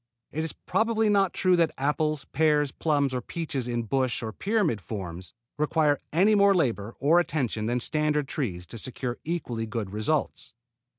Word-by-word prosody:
It 155 - -2
is 160 - -2
probably 225 -1 +1
not 195 -3 +3
true 185 -1 +3
that 165 -2 +2
apples, 150 +1 0
pears, 150 -1 +3
plums 145 -3 0
or 125 - -1
peaches 140 -3 -4
in 120 -1 -1
bush 130 +1 0
or 110 - -3
pyramid 195 - 0
forms 90 -5 -6 0.3
require 150 -1 +2
any 190 +7 +4
more 200 -1 +5
labor 115 - 0
or 155 +6 +5
attention 125 -10 -1
than 120 +1 0
standard 150 +2 +1
trees 95 - -3
to 115 - -8
secure 125 0 -4
equally 125 -9 -3
good 110 -3 -4
results. 115 +3 -2
145 Hz, 165 wpm, -27 LUFS, 115-160 Hz, 0.3 s, more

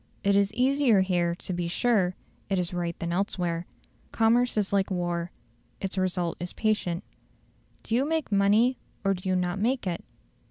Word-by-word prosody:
It 200 0 +3
is 200 0 +3
easier 255 -4 +4
here 175 -2 +1
to 185 - -5
be 175 -1 -2
sure 185 -1 +2 0.3
it 195 - +1
is 180 -1 -1
right 170 -1 -2
than 170 0 -3
elsewhere. 175 -2 -1 0.4
Commerce 235 +1 +3
is 200 -2 0
like 195 0 +2
war; 175 -2 -2 0.5
its 195 -1 -3
result 180 -3 -1
is 175 0 -4
patent. 210 -6 0 0.8
Do - - -4
you 245 +3 +3
make 315 -3 -1
money 210 +6 +3 0.2
or 195 -1 +3
do 185 0 -4
you 185 - +2
not 180 +1 -1
make 245 +3 0
it? 175 -2 -3
190 Hz, 170 wpm, -27 LUFS, 175-220 Hz, 0.8 s, easier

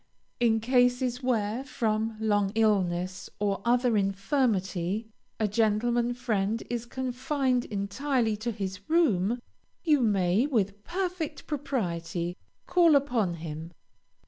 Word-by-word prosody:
In 225 -2 +3
cases 245 +1 +2
where, 235 -1 0
from 225 -4 -1
long 205 -3 +1
illness 185 -4 +1
or 200 -1 -1
other 245 0 +3
infirmity, 195 -1 0 0.3
a 215 - +2
gentleman 235 +3 +1
friend 225 -3 -1
is 240 -1 -3
confined 255 0 -1
entirely 220 +3 -1
to 230 +3 -2
his 195 -2 -6
room, 245 - +2 0.4
you 305 -4 +4
may, 200 +1 +2
with 205 -6 -1
perfect 350 - -3
propriety, 180 - -2 0.3
call 340 -4 +5
upon 240 -10 +1
him. 160 +1 -7
225 Hz, 110 wpm, -28 LUFS, 195-255 Hz, 0.4 s, call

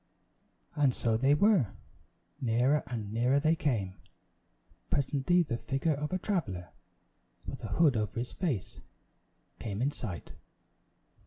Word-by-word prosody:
And 140 -4 +3
so 115 -2 +1
they 135 +5 +4
were; 175 - +3 0.7
nearer 125 +5 +3
and 110 -4 -4
nearer 125 +5 +3
they 155 +3 +3
came. 110 - -1 0.9
Presently 145 +6 +2
the 120 -7 -2
figure 145 +3 0
of 150 +1 -3
a 185 - +1
traveler, 120 - -2 0.8
with - - -7
a - - -3
hood 155 -6 +4
over 105 -2 -2
his 120 +1 -3
face, 145 - -2 0.8
came 105 -3 -4
in 135 +4 +1
sight. 100 -11 -6
130 Hz, 130 wpm, -31 LUFS, 115-150 Hz, 0.9 s, they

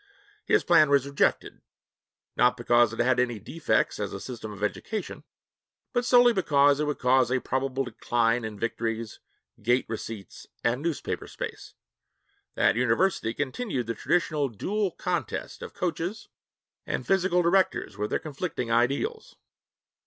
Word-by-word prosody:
His 430 - +3
plan 155 -4 +5
was 140 -1 +3
rejected, 140 0 0 0.7
not 125 +1 +3
because 120 -1 +3
it 115 - -7
had 125 +1 +2
any 120 -2 +1
defects 160 - -1
as - - -3
a - - -5
system 115 -4 -7
of 105 0 -8
education, 210 - -4 0.7
but 245 -1 +1
solely 245 -1 +6
because 145 -7 +3
it 150 - +1
would 150 -1 -2
cause 125 -1 +3
a 130 - +2
probable 135 +1 -1
decline 120 -1 0
in 110 -1 -5
victories, 115 0 -3 0.4
gate 120 +4 +2
receipts, 110 -3 -7 0.2
and 120 +3 +1
newspaper 165 -2 -3
space. - - -7 0.8
That - - +3
university 125 +2 +1
continued 145 - -2
the 115 - -2
traditional 150 +3 0
dual 195 - -1
contest 175 - -4
of 475 - -8
coaches 175 +4 -3 0.6
and - - -3
physical 185 -2 +2
directors 185 +2 +1
with 105 +1 -3
their - - +1
conflicting 140 -5 -4
ideals. 140 - 0
130 Hz, 140 wpm, -27 LUFS, 115-175 Hz, 0.8 s, solely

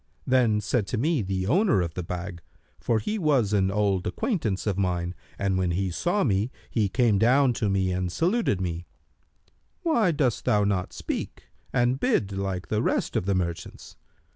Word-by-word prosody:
Then 120 -5 +3
said 105 0 0
to 125 - -2
me 150 +3 +1
the 95 -1 -2
owner 140 - +3
of 85 -2 -2
the 90 - -4
bag 90 +1 -6 0.4
(for 115 - +1
he 210 - -2
was 135 - +2
an 95 -2 +3
old 100 -2 0
acquaintance 110 - -1
of 105 -3 0
mine, 90 -2 -1 0.2
and 95 -1 0
when 90 -1 +1
he 95 +2 -1
saw 175 - 0
me, 105 0 +1 0.2
he 105 -4 +1
came 115 -2 +2
down 125 +3 +4
to 105 - +2
me 95 -1 +1
and 90 -1 -2
saluted 180 - +1
me), 85 -2 -4 1.0
'Why 310 - +3
dost 135 -7 0
thou 105 -1 +3
not 100 -3 0
speak - - -5 0.3
and 125 +2 +1
bid 140 - +1
like 95 -2 -3
the 110 0 +1
rest - - 0
of 90 - 0
the 100 - +2
merchants?' 85 -2 -4
100 Hz, 180 wpm, -26 LUFS, 95-125 Hz, 1.0 s, down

